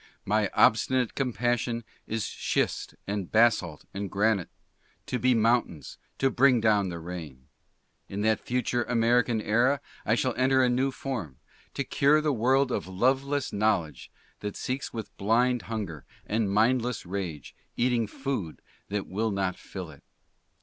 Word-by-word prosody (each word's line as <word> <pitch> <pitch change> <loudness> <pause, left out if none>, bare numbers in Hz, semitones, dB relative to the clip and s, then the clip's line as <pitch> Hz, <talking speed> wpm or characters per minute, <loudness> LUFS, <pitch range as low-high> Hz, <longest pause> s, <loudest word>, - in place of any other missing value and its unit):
My 105 0 +2
obstinate 125 +2 +3
compassion 120 -1 -1 0.2
is 110 -1 -2
schist - - -2
and 100 -3 -3
basalt 105 -9 +2
and 100 0 -4
granite, 100 -2 +1 0.6
to 125 - -2
be 125 -1 +3
mountains, 115 - 0 0.2
to 135 0 +2
bring 130 -1 +4
down 105 -3 +3
the 85 - -5
rain. 80 -7 -8 0.6
In 100 +1 -4
that 110 -1 +2
future 120 0 -1
American 120 0 +2
Era 120 +7 +2 0.2
I 110 - +2
shall 130 +1 0
enter 130 +1 +4
a 125 - +3
new 130 +2 +2
form; 120 - -5 0.4
to 140 - -1
cure 140 +3 +3
the 150 -1 +1
world 130 +3 +2
of - - -2
loveless 135 +8 0
knowledge 95 - 0 0.3
that 105 -1 -5
seeks 130 +2 -3
with 110 -2 -7
blind 120 +4 +2
hunger: 100 - -4 0.2
and 110 -1 0
mindless 120 +3 +1
rage 90 -6 -5 0.2
eating 120 -2 +2
food 125 - -4 0.3
that 100 0 -2
will 110 +4 -1
not 95 -3 -1
fill - - -8
it." - - -16
115 Hz, 145 wpm, -28 LUFS, 100-125 Hz, 0.6 s, bring